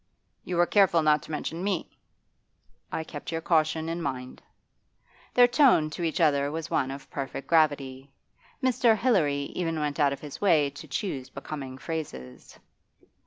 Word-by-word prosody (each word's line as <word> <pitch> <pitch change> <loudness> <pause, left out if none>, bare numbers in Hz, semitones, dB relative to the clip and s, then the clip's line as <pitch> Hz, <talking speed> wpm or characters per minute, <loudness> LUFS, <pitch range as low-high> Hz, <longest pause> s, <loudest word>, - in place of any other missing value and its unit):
'You 180 - -4
were 175 - +5
careful 180 -4 +4
not 150 -1 +4
to - - -11
mention 165 +3 -4
me?' 195 -4 -2 1.0
'I 160 - -2
kept 150 -1 -8
your 165 - -1
caution 160 -1 +1
in 165 +1 -3
mind.' 130 -4 -5 0.9
Their 245 0 +7
tone 245 - +4
to 165 - -6
each 165 0 -1
other 145 -3 +3
was 160 +1 -5
one 135 -2 +1
of 135 +1 -8
perfect 135 0 -5
gravity. 140 -4 +1 0.5
Mr. 245 -3 +3
Hilary 150 - +1
even 165 -3 -2
went 150 -1 -2
out 145 -1 +4
of 140 - -4
his 145 -2 -9
way 155 -8 +3
to 145 +3 -11
choose 140 -2 -4
becoming 135 -2 -7
phrases. 65 - -7
155 Hz, 160 wpm, -27 LUFS, 140-170 Hz, 1.0 s, Their